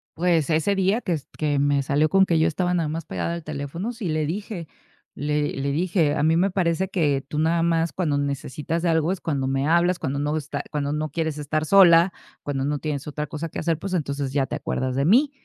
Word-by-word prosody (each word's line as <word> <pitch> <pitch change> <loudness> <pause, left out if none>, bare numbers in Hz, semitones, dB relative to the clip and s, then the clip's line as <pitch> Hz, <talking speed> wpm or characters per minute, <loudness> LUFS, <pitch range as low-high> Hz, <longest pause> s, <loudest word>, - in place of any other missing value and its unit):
Pues, 170 -2 +1
ese 160 +6 +2
día 195 +4 +1
que 180 - -1
s 150 -4 -5
que 145 -2 0
me 140 0 +2
salió 145 +3 +2
con 195 +3 +5
que 165 -3 +2
yo 160 - +4
estaba 180 +2 0
nada 165 -3 0
más 160 +1 -4
pegada 170 - -3
al 170 -1 -5
teléfono 155 - -4
sí 220 -7 -5
le 155 -1 0
dije. 180 0 -5 0.5
Le 150 0 -1
le 140 +1 -2
dije: 165 -1 +1
"A - - 0
mí 160 +1 +4
me 190 +3 +3
parece 185 0 0
que 145 -8 +1
tú 150 - -3
nada 165 +2 +2
más 165 -1 +1
cuando 155 -6 0
necesitas 140 +3 -3
algo 165 0 +2
es 190 - -3
cuando 140 -4 -1
me 135 +2 0
hablas 175 +2 +3
cuando 140 -2 -2
no 145 +1 -1
está 150 -1 -4
cuando 145 -1 -1
no 155 0 -2
quieres 160 -2 -2
estar 155 +1 -1
sola, 175 -1 +6 0.3
cuando 135 -2 -2
no 145 +1 0
tienes 150 -1 -4
otra 150 0 -3
cosa 155 +2 -5
que - - -6
hacer, 165 -1 0
pues, 195 +1 -5
entonces 140 -4 -2
ya 140 -2 +2
te - - -4
acuerdas 130 -1 -2
de 140 +2 +1
mí". 265 - +4
155 Hz, 235 wpm, -24 LUFS, 145-170 Hz, 0.5 s, sola